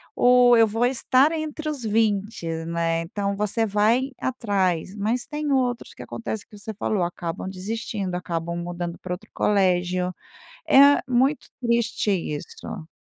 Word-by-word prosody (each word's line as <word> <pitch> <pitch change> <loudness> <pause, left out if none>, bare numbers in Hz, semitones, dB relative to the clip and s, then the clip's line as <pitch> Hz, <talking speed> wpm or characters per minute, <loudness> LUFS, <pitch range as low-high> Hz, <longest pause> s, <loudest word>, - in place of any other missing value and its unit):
o 245 0 +6
eu 225 -1 +6
vou 225 +3 +1
estar 260 +3 +3
entre 310 -1 -4
os 285 -5 -5
20," 215 -3 0 0.2
né. 165 0 0
Então, 200 +4 -3
você 210 +2 0
vai 220 +6 +2
atrás, 195 -7 -1
mas 220 +4 -1
tem 300 -1 -3
outros 250 -3 0
que - - -10
acontece 220 -2 -5
que 210 - -14
você 215 +2 -7
falou: 205 -2 -1
acabam 175 +1 -4
desistindo, 195 0 -4
acabam 170 -1 -3
mudando 175 0 -5
para 180 - -4
outro 205 +5 -9
colégio. 180 -2 +1 0.5
É 280 +1 +7
muito 260 +4 +1
triste 235 -3 +1
isso. 165 0 -5
210 Hz, 145 wpm, -24 LUFS, 180-245 Hz, 0.5 s, É